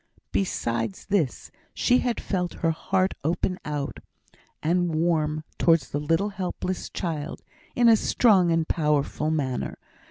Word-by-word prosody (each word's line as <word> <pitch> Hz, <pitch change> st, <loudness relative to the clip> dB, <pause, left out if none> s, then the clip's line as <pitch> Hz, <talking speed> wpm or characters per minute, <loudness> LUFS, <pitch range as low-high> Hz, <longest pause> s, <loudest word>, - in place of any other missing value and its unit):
Besides 110 Hz, +3 st, -1 dB
this, 185 Hz, -10 st, -1 dB, 0.2 s
she 250 Hz, 0 st, +3 dB
had 245 Hz, -2 st, -1 dB
felt 180 Hz, -3 st, -2 dB
her 165 Hz, -, +4 dB
heart 185 Hz, +3 st, 0 dB
open 175 Hz, +4 st, 0 dB
out, 145 Hz, -1 st, -4 dB, 0.6 s
and 175 Hz, 0 st, +1 dB
warm 155 Hz, -2 st, +1 dB, 0.2 s
towards 165 Hz, -6 st, +3 dB
the 145 Hz, -, -2 dB
little 165 Hz, +7 st, +1 dB
helpless 185 Hz, -2 st, -4 dB
child, 160 Hz, -3 st, -4 dB, 0.3 s
in 240 Hz, -1 st, +4 dB
a 230 Hz, -, +8 dB
strong 200 Hz, -5 st, +4 dB
and 165 Hz, -1 st, +1 dB
powerful 150 Hz, -1 st, +1 dB
manner. 140 Hz, -5 st, -2 dB
165 Hz, 130 wpm, -26 LUFS, 150-185 Hz, 0.6 s, a